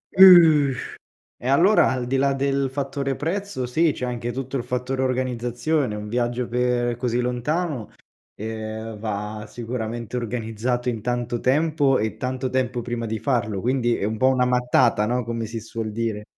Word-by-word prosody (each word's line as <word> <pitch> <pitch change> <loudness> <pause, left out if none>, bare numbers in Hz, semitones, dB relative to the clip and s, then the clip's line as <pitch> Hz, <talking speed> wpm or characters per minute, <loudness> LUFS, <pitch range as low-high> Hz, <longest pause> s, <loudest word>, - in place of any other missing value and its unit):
Uh, 165 -7 +8 0.7
e 125 - -5
allora 180 +10 +5
al 125 -2 -2
di 135 +2 0
là 140 +1 +2
del 135 0 0
fattore 135 0 -2
prezzo 165 -3 -3
sì 160 +6 +2
c'è 125 - -5
anche 120 -1 -3
tutto 130 +2 -4
il 120 - -1
fattore 125 +1 -2
organizzazione. 125 0 -1
Un 105 0 -6
viaggio 120 +1 -1
per 120 0 0
così 120 -1 -1
lontano, 125 +2 -2 0.5
ehm, 110 0 -6
va 105 0 -4
sicuramente 120 0 -5
organizzato 120 +1 -2
in 115 -3 -2
tanto 120 -1 -2
tempo 145 0 +2
e 110 0 -2
tanto 130 0 -2
tempo 125 -2 -1
prima 120 -1 -3
di 110 0 -3
farlo 110 -7 -1
quindi 120 0 +1
è - - -3
un 110 +1 -1
po' 130 +4 +3
una 130 -1 +3
mattata 125 -4 +2
no, 125 0 0
come 115 -1 -3
si 115 +1 -5
suol 110 0 -5
dire. 110 -1 -3
125 Hz, 165 wpm, -23 LUFS, 115-135 Hz, 0.7 s, Uh